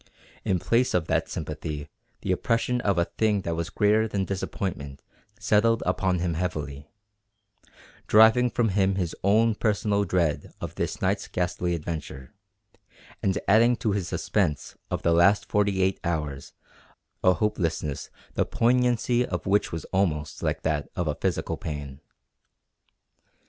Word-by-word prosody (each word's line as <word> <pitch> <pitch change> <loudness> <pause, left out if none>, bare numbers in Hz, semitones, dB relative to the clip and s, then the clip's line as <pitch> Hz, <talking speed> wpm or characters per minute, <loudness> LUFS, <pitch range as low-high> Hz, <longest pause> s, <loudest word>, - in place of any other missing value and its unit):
In 95 - +1
place 115 +7 +1
of 85 -3 +1
that - - +1
sympathy 75 -1 -5 0.3
the - - -1
oppression 120 +1 0
of 100 -5 +1
a 85 - +3
thing 105 0 0
that 85 -2 -2
was 85 0 -3
greater 105 +4 +2
than 100 -3 -1
disappointment 85 -7 -4 0.4
settled 110 +1 +2
upon 90 0 +1
him 85 -1 -1
heavily, 75 -4 -4 1.2
driving 110 +3 +6
from 120 -2 +1
him 95 -1 +2
his 90 -4 -2
own 110 +4 +4
personal 105 -1 +1
dread 85 -5 -1
of - - -5
this - - -3
night's - - 0
ghastly 90 0 -1
adventure, 75 -5 -6 0.9
and 95 0 +1
adding 115 +4 +5
to 110 -2 -1
his 100 -3 -1
suspense 75 -3 -1
of - - -3
the 85 - +3
last 100 +5 +4
forty 100 -2 +1
eight 95 +1 +1
hours 75 -5 -3 0.7
a 90 - +6
hopelessness 80 -6 -2 0.2
the - - +2
poignancy 125 0 +2
of 90 -7 -4
which 100 +2 +2
was 80 - -5
almost 75 -6 0
like - - -2
that 75 -2 -1
of 85 - -1
a 75 - +1
physical 90 +4 -2
pain. 75 -2 -6
95 Hz, 145 wpm, -26 LUFS, 80-105 Hz, 1.2 s, driving